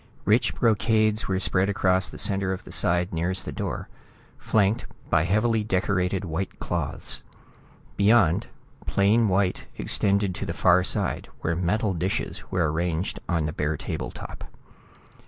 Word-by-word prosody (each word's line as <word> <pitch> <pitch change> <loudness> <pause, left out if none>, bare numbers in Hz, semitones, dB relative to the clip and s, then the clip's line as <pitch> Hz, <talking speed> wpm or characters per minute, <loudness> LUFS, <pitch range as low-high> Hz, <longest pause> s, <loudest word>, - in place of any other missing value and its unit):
Rich 110 +4 +3
brocades 110 -1 +2
were 95 -1 0
spread 95 0 +1
across 95 -2 +2
the - - -10
center 95 -1 0
of 95 - -7
the - - -11
side 85 +1 +1
nearest 90 +3 -1
the - - -4
door, - - -4 0.5
flanked 110 +2 +1 0.2
by 80 - +3
heavily 105 +4 +2
decorated 95 -2 0
white 90 +3 -4
cloths. 80 -5 -3 0.8
Beyond, 100 -5 +4 0.4
plain 105 +3 +3
white 95 0 0
extended 100 -1 +2
to 90 - -5
the 85 - -3
far 90 0 +4
side, 100 0 -1
where 85 - 0
metal 100 +4 0
dishes 90 +2 -2
were 85 -4 +1
arranged 85 +2 -2
on 85 -3 +1
the 75 - -3
bare 75 +1 -1
table - - -4
top. - - -9
95 Hz, 145 wpm, -25 LUFS, 85-105 Hz, 0.8 s, Beyond